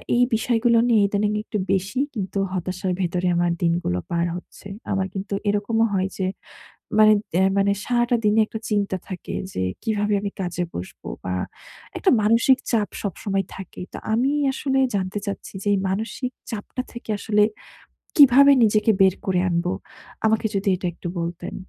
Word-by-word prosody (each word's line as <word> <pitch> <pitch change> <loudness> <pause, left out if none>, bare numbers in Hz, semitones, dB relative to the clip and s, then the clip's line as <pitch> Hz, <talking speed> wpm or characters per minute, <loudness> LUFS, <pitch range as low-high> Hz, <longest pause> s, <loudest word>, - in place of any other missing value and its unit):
এই 245 - +5
বিষয়গুলো 230 +1 +2
নিয়ে 225 -3 +4
ইদানিং 205 +1 0
একটু 215 - -4 0.2
বেশি 195 +6 -1 0.2
কিন্তু 195 -2 -3
হতাশার 185 +1 -2
ভেতরে 180 0 0
আমার 175 0 +2
দিনগুলো 170 - +1
পার 170 0 +1
হচ্ছে। 180 +2 -10 0.2
আমার 195 -1 0
কিন্তু 195 +1 -5 0.2
এরকমও 210 +3 +1
হয় 190 -1 +1
যে 190 - -1 0.7
মানে, 215 0 +8 0.2
অ্যা 185 - +4
মানে 200 0 +3
সারাটা 240 0 +2
দিনে 210 +1 +4
একটা 220 - -6
চিন্তা 205 -3 0
থাকে 185 -2 -6 0.2
যে 95 - -1 0.2
কিভাবে 210 -1 0
আমি 200 -1 -3
কাজে 180 -1 -2
বসবো? 90 +2 -8 0.2
বা 90 - -2 0.6
একটা 380 - +3
মানসিক 230 +5 +4
চাপ 215 -4 +1
সবসময় 195 0 -2
থাকে। 190 -2 -9
তো - - -5 0.2
আমি 245 +5 +2 0.2
আসলে 270 0 0 0.2
জানতে 190 0 -2
চাচ্ছি 200 - -6
যেই 205 -1 +3
মানসিক 225 +6 -3 0.2
চাপটা 225 +3 -4
থেকে 240 -1 -10
আসলে 210 0 +2 0.8
কীভাবে 280 0 +8
নিজেকে 215 +1 +3
বের 190 -1 +6
করে 185 -2 +2
আনব? 170 0 0 0.6
আমাকে 220 0 +2
যদি 195 0 0
এটা 180 - -4
একটু 175 - -7
বলতেন। 170 +1 -5
200 Hz, 160 wpm, -23 LUFS, 185-225 Hz, 0.8 s, মানে